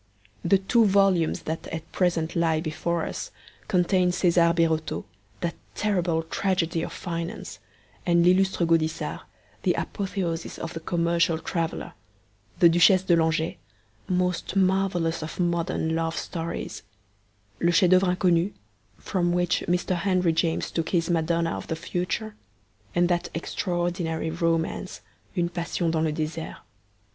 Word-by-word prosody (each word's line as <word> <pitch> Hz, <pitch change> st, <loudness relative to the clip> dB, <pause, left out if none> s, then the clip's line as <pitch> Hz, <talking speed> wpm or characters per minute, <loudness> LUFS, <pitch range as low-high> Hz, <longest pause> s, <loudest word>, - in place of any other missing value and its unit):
The 195 Hz, -, +4 dB
two 220 Hz, +4 st, +3 dB
volumes 195 Hz, -4 st, +3 dB
that 160 Hz, +1 st, -4 dB
at 165 Hz, 0 st, -7 dB
present 170 Hz, -3 st, 0 dB
lie 165 Hz, -2 st, +2 dB
before 165 Hz, +1 st, -2 dB
us -, -, -5 dB, 0.4 s
contain 180 Hz, -2 st, +3 dB
Cesar 175 Hz, -1 st, +3 dB
Birotteau, 165 Hz, -2 st, 0 dB, 0.4 s
that 170 Hz, -1 st, -1 dB, 0.2 s
terrible 175 Hz, -6 st, 0 dB
tragedy 170 Hz, -1 st, 0 dB
of -, -, -4 dB
finance, 170 Hz, +3 st, -5 dB, 0.4 s
and 170 Hz, -1 st, +3 dB
L'lllustre 185 Hz, 0 st, +3 dB
Gaudissart, 165 Hz, -1 st, 0 dB, 0.4 s
the -, -, +2 dB
apotheosis 180 Hz, -4 st, -3 dB
of 165 Hz, -, -5 dB
the 165 Hz, -, -4 dB
commercial 170 Hz, 0 st, +1 dB
traveller, 165 Hz, 0 st, -3 dB, 0.6 s
the 175 Hz, -, +7 dB
Duchesse 175 Hz, +3 st, +5 dB
de 175 Hz, -2 st, +4 dB
Langeais, 160 Hz, 0 st, +1 dB, 0.5 s
most 180 Hz, 0 st, -1 dB
marvellous 185 Hz, -4 st, +1 dB
of 155 Hz, +3 st, -6 dB
modern 170 Hz, -2 st, 0 dB
love 165 Hz, 0 st, -1 dB
stories, 165 Hz, -1 st, -4 dB, 0.8 s
Le 170 Hz, -, +3 dB
Chef 175 Hz, +1 st, +4 dB
d'OEuvre 185 Hz, -1 st, +4 dB
Inconnu, 180 Hz, +1 st, +2 dB, 0.5 s
from 175 Hz, -2 st, -1 dB
which 175 Hz, -1 st, +1 dB
Mr. 180 Hz, +1 st, +1 dB
Henry 180 Hz, -2 st, +2 dB
James 165 Hz, 0 st, 0 dB
took 165 Hz, -1 st, -2 dB
his 170 Hz, -1 st, +1 dB
Madonna 165 Hz, 0 st, +1 dB
of -, -, -7 dB
the 160 Hz, -, -2 dB
Future, 180 Hz, +6 st, -3 dB, 0.6 s
and 175 Hz, 0 st, +4 dB
that 175 Hz, -1 st, 0 dB
extraordinary 175 Hz, -1 st, -2 dB
romance 165 Hz, +2 st, -1 dB, 0.4 s
Une 170 Hz, -1 st, +1 dB
Passion 170 Hz, -1 st, -1 dB
dans 160 Hz, -1 st, +1 dB
le 160 Hz, -, +1 dB
Desert. 155 Hz, +1 st, -4 dB
170 Hz, 135 wpm, -26 LUFS, 165-180 Hz, 0.8 s, the